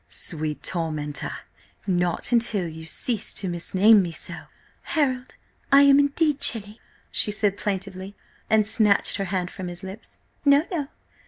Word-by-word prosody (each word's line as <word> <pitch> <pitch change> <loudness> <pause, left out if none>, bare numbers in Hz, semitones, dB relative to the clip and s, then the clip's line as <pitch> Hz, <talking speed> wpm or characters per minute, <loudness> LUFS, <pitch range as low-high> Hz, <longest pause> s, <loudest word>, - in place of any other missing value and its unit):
"Sweet 155 -2 -3
tormentor, 155 -4 -3 0.5
not 175 0 -1
until 225 -6 +2
you 160 0 -9
cease 220 +6 -2
so - - +3
to 195 - -3
misname 190 +5 +4
me." 175 -2 -3 0.7
"Harold, 260 -5 -2 0.4
I 275 +1 +7
am 280 0 +6
indeed 285 +1 +1
chilly!" 210 -3 +2 0.3
she - - +3
said 205 -1 0
plaintively 195 -1 -5 0.3
and 215 -1 +3
snatched 210 -2 +2
her 195 - -2
hand 185 -1 -3
from 185 -2 -7
his 175 +1 -7
lips. 190 +4 -9 0.3
"No, 285 +2 +4
no! 305 -6 -2
200 Hz, 145 wpm, -24 LUFS, 180-240 Hz, 0.7 s, I